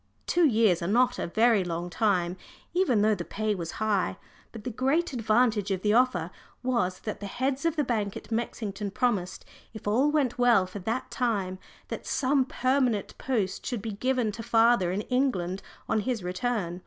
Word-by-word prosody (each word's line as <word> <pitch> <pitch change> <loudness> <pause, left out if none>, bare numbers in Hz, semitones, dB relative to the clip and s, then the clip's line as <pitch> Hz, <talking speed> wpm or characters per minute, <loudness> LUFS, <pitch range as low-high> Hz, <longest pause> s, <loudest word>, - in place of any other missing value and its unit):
Two 345 -2 +4
years 220 - +3
are 170 - -2
not 245 +5 +2
a - - -2
very 220 +2 +3
long 170 0 -3
time, 180 -1 +1 0.4
even 300 - +3
though 215 0 +4
the 180 -4 -3
pay 215 +4 -2
was 170 -4 -5
high, 200 - 0 0.3
but 225 -3 -9
the 250 - -3
great 280 +8 0
advantage 220 -3 +2
of 190 -2 -2
the 210 0 +3
offer 210 -9 +2 0.3
was 235 -8 0
that 215 - -5
the 205 - -5
heads 260 +7 -2
of 330 -1 +2
the 300 - +1
bank 210 -6 -1
at - - -12
Mexington 215 -3 -3
promised, 200 -4 -1 0.3
if 215 - -8
all 250 +8 +3
went 280 -5 0
well 240 -6 +5
for 185 +2 -8
that 230 +7 -3
time, 200 -7 -1 0.3
that - - -6
some 270 -1 +2
permanent 255 -5 0
post 220 -8 -1
should 240 -6 -3
be 225 - -3
given 250 +1 0
to 225 - -7
father 225 -5 +3
in 195 +3 -1
England 210 -8 0 0.3
on 220 - +1
his 225 -1 -2
return. 180 -1 -2
220 Hz, 185 wpm, -28 LUFS, 195-250 Hz, 0.4 s, well